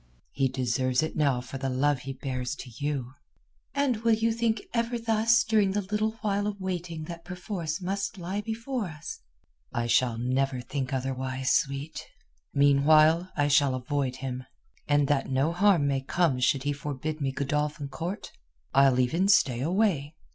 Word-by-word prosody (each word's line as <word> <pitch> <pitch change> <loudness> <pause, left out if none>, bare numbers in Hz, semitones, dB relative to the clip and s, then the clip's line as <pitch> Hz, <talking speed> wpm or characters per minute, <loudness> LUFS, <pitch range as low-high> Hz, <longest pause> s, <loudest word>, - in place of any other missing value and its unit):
"He 135 -1 +1
deserves 130 +1 0
it 160 - -3
now 140 -5 +2
for 130 +2 -7
the 135 0 -2
love 135 +2 +1
he 135 +1 -6
bears 130 0 -4
to 125 - -9
you." 140 -4 -2 0.6
"And 280 -4 +2
you - - -11
will 225 0 +2
think 230 -2 0
ever 235 0 0
thus 230 0 +3
during 210 -4 +2
the 205 0 0
little 215 +1 +1
while 205 -1 0
of 205 -1 -4
waiting 175 -4 -4
that 170 +1 -8
perforce 180 -2 -4
must 195 +3 -3
lie 185 +3 -3
before 230 +2 -3
us?" 160 -4 -7 0.5
"I 120 - -1
shall 120 0 +2
never 130 +2 0
think 130 +2 -4
otherwise, 130 0 -2
sweet. 140 +3 -1 0.5
Meanwhile 155 +5 +4
I 145 -1 +3
shall 140 -2 +4
avoid 130 0 -2
him, 130 -1 -5 0.4
and 145 -1 +3
that 140 -1 +1
no 135 +4 +1
harm 180 -4 +4
may 135 -1 +1
come 135 -1 +1
should 130 +1 +2
he 145 0 0
forbid 145 +2 -4
me 135 -1 0
Godolphin 145 +2 -2
Court 165 +8 -5 0.4
I'll 135 -1 +5
even 165 +10 +2
stay 135 -11 +4
away. 165 -3 +1
145 Hz, 165 wpm, -28 LUFS, 135-190 Hz, 0.6 s, I'll